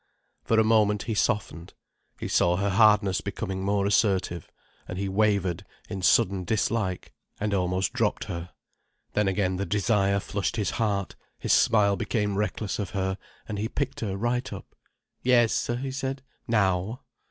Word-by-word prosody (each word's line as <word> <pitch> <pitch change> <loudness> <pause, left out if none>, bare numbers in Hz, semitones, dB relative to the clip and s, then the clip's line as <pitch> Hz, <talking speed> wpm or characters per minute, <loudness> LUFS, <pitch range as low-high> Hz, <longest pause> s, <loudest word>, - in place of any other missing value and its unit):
For 115 - +2
a - - +5
moment 105 -2 +3
he 115 - -2
softened. 95 -5 -1 0.4
He - - -4
saw 85 0 +3
her 100 +2 0
hardness 105 -2 +4
becoming 95 -2 -4
more 100 0 +1
assertive, 95 -5 +1 0.4
and 90 - -5
he 100 +1 -2
wavered 95 -3 +1 0.3
in 95 -2 -4
sudden 95 0 +3
dislike, 105 -2 -1 0.3
and 105 0 -1
almost 95 0 0
dropped - - 0
her. 85 +1 -6 0.6
Then 105 -1 +2
again 95 -1 0
the 100 - -2
desire 100 +1 +2
flushed 100 0 -2
his 105 -6 -1
heart, 100 -4 -1 0.2
his - - +1
smile 100 -3 +4
became 105 -3 -1
reckless 105 +1 -2
of 100 - -2
her, 95 0 -1 0.3
and 105 -2 -4
he 110 +2 -2
picked 135 0 -3
her 100 -4 -3
right 125 +4 -1
up. 100 - -9 0.5
"Yes," 120 -3 +3
he 125 +3 -2
said. 135 0 -4 0.2
"Now." 105 0 +1
100 Hz, 155 wpm, -26 LUFS, 95-110 Hz, 0.6 s, a